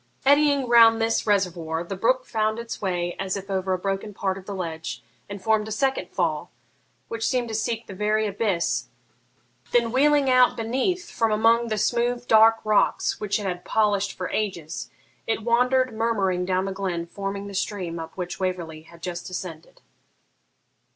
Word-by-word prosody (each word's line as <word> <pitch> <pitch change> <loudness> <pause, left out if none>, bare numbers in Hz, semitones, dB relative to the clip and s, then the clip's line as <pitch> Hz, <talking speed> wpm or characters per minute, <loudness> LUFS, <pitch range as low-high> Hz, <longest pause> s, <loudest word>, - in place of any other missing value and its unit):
Eddying 285 -1 +4
round 230 -1 +7
this 225 0 0
reservoir, 175 -5 0
the 195 +3 -5
brook 255 +6 +1
found 220 -1 0
its 235 0 -6
way 175 -3 -1
as 190 0 -2
if 195 0 -7
over 190 0 -1
a 185 - +2
broken 195 +2 -3
part 190 -1 -1
of 190 -1 -11
the 200 - -4
ledge, 160 -9 -5 0.3
and 200 -2 -7
formed 220 0 +2
a - - -6
second 265 +5 0
fall, - - -1 0.6
which 230 0 -5
seemed 250 -2 0
to 225 - -6
seek 225 +1 -2
the 200 - -9
very 210 +2 +1
abyss; 200 -4 -1 0.9
then, 235 -1 +3
wheeling 285 +2 +3
out 255 -1 +5
beneath 265 +11 -1
from 225 -1 +1
among 230 +2 +3
the 215 -1 -1
smooth 240 +3 0
dark 225 +1 +7
rocks 215 -1 +2
which 210 0 -1
it 205 - -5
had 180 -2 -3
polished 205 -2 +1
for 180 - -5
ages, 175 -7 -3 0.4
it 225 -1 -1
wandered 250 +2 +2
murmuring 200 -5 0
down 185 +1 0
the 195 - -3
glen, 185 -3 -3
forming 200 +2 -5
the 200 - -8
stream 185 -4 -3
up 160 +2 -8
which 180 -1 -5
Waverley 175 -4 -3
had 165 +1 -17
just 175 -1 -5
ascended. 175 -3 -8
205 Hz, 175 wpm, -24 LUFS, 185-230 Hz, 0.9 s, round